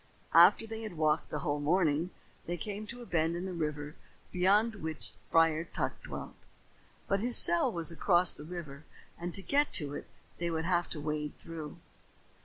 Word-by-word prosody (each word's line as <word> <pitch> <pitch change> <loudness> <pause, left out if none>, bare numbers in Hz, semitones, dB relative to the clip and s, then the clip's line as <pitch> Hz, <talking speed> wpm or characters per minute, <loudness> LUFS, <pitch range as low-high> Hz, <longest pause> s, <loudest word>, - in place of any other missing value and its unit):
After - - +7
they 225 0 -6
had 215 -7 -7
walked 155 0 +1
a - - -2
whole 145 0 -1
morning, 160 +1 +2 0.4
they 175 +1 -2
came 210 +4 -5
to 235 - -7
the 245 - -9
bend 165 -3 0
in 175 +2 -4
the 190 - -4
river 150 -3 -3 0.4
beyond 205 +5 +3
which 160 -3 -6 0.2
Friar 165 -1 +4
Tuck 170 - -3
dwelt. - - -7 0.7
But 195 - +1
his 240 +3 +4
cell 170 0 +5
was 170 -1 -2
across 175 +1 +4
the 150 - -10
river 155 -4 -8 0.4
and 175 +1 -4
to 195 - -3
get 285 +5 +2
to 145 -4 -1
it - - -7 0.3
they 170 0 -1
would 160 -1 -2
have 175 -1 +1
to 155 - -4
wade 150 0 -3
through. 160 -3 -8
170 Hz, 185 wpm, -31 LUFS, 155-185 Hz, 0.7 s, After